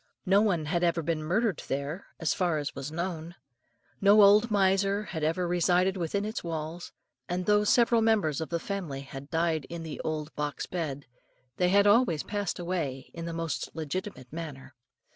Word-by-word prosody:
No 195 Hz, +2 st, +5 dB
one 180 Hz, -8 st, +1 dB
had 170 Hz, +3 st, 0 dB
ever 170 Hz, -1 st, +2 dB
been 160 Hz, 0 st, -1 dB
murdered 190 Hz, +5 st, 0 dB
there, 140 Hz, +6 st, -3 dB, 0.2 s
so 160 Hz, -, +1 dB
far 175 Hz, -4 st, +1 dB
as 145 Hz, -1 st, -3 dB
was 140 Hz, +2 st, -6 dB
known. 170 Hz, 0 st, -4 dB, 0.7 s
No 205 Hz, +1 st, +7 dB
old 210 Hz, +4 st, +6 dB
miser 195 Hz, 0 st, +2 dB
had 160 Hz, -7 st, -5 dB
ever 165 Hz, +3 st, +1 dB
resided 180 Hz, +2 st, +2 dB
within 190 Hz, +3 st, -1 dB
its 215 Hz, +1 st, -4 dB
walls; 165 Hz, +1 st, -5 dB, 0.4 s
and 180 Hz, +1 st, -1 dB
though 210 Hz, 0 st, +4 dB
several 235 Hz, +2 st, +4 dB
members 205 Hz, -10 st, +2 dB
of 160 Hz, -, -4 dB
the 170 Hz, -, -1 dB
family 170 Hz, -8 st, -4 dB
had 140 Hz, +1 st, -9 dB
died 160 Hz, -2 st, 0 dB
in 170 Hz, -1 st, -7 dB
the 160 Hz, -2 st, -6 dB
old 155 Hz, -1 st, -3 dB
box 150 Hz, -1 st, -3 dB
bed, 145 Hz, -6 st, -4 dB, 0.5 s
they 180 Hz, -1 st, +3 dB
had 200 Hz, +2 st, +5 dB
all 230 Hz, +5 st, +6 dB, 0.2 s
passed 205 Hz, -2 st, -2 dB
away 165 Hz, -7 st, -3 dB
in 165 Hz, 0 st, -6 dB
the 170 Hz, -, -4 dB
most 165 Hz, -2 st, -3 dB
legitimate 155 Hz, -3 st, -5 dB
manner. 140 Hz, -5 st, -7 dB
170 Hz, 180 wpm, -29 LUFS, 155-195 Hz, 0.7 s, No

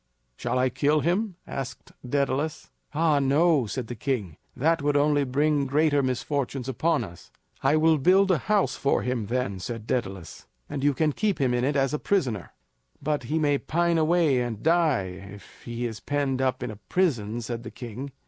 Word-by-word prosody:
"Shall 125 Hz, -, -2 dB
I 130 Hz, 0 st, +3 dB
kill 145 Hz, +4 st, +2 dB
him?" 185 Hz, +4 st, 0 dB
asked 130 Hz, -2 st, -6 dB
Daedalus. 140 Hz, +3 st, -1 dB, 0.2 s
"Ah, 155 Hz, -1 st, +2 dB
no!" 140 Hz, -1 st, +3 dB
said 125 Hz, +3 st, -4 dB
the 120 Hz, -, -6 dB
king. 110 Hz, -, -3 dB, 0.2 s
"That 165 Hz, +4 st, +2 dB
would 145 Hz, 0 st, +2 dB
only 145 Hz, 0 st, +3 dB
bring 145 Hz, +2 st, +1 dB
greater 145 Hz, +1 st, +3 dB
misfortunes 130 Hz, 0 st, -2 dB
upon 150 Hz, +2 st, +1 dB
us." 85 Hz, -5 st, -11 dB, 0.3 s
"I 135 Hz, +3 st, +3 dB
will 160 Hz, 0 st, +4 dB
build 190 Hz, +6 st, +4 dB
a 170 Hz, -, +3 dB
house 205 Hz, 0 st, +1 dB
for 140 Hz, -, +1 dB
him 125 Hz, -4 st, -2 dB
then," 115 Hz, -5 st, -2 dB
said 115 Hz, +3 st, -5 dB
Daedalus, 95 Hz, -9 st, -4 dB, 0.2 s
"and 140 Hz, -, -4 dB
you 145 Hz, -1 st, +3 dB
can 155 Hz, 0 st, +1 dB
keep 210 Hz, +2 st, 0 dB
him 130 Hz, -3 st, +2 dB
in 125 Hz, 0 st, +1 dB
it 140 Hz, +3 st, +1 dB
as 135 Hz, -1 st, +1 dB
a 150 Hz, -, -1 dB
prisoner." 125 Hz, -, 0 dB, 0.5 s
"But 145 Hz, -3 st, -2 dB
he 155 Hz, +6 st, -1 dB
may 145 Hz, -3 st, +2 dB
pine 170 Hz, 0 st, +1 dB
away 155 Hz, -5 st, +3 dB
and 115 Hz, -3 st, -4 dB
die 105 Hz, -, +1 dB
if 100 Hz, -, -16 dB
he 120 Hz, 0 st, -4 dB
is 110 Hz, -2 st, -4 dB
penned 135 Hz, -1 st, -1 dB
up 130 Hz, -1 st, 0 dB
in 115 Hz, -3 st, -4 dB
prison," 120 Hz, -, +1 dB
said 115 Hz, +1 st, -4 dB
the 110 Hz, -, -7 dB
king. 120 Hz, +4 st, -7 dB
140 Hz, 185 wpm, -26 LUFS, 120-155 Hz, 0.5 s, will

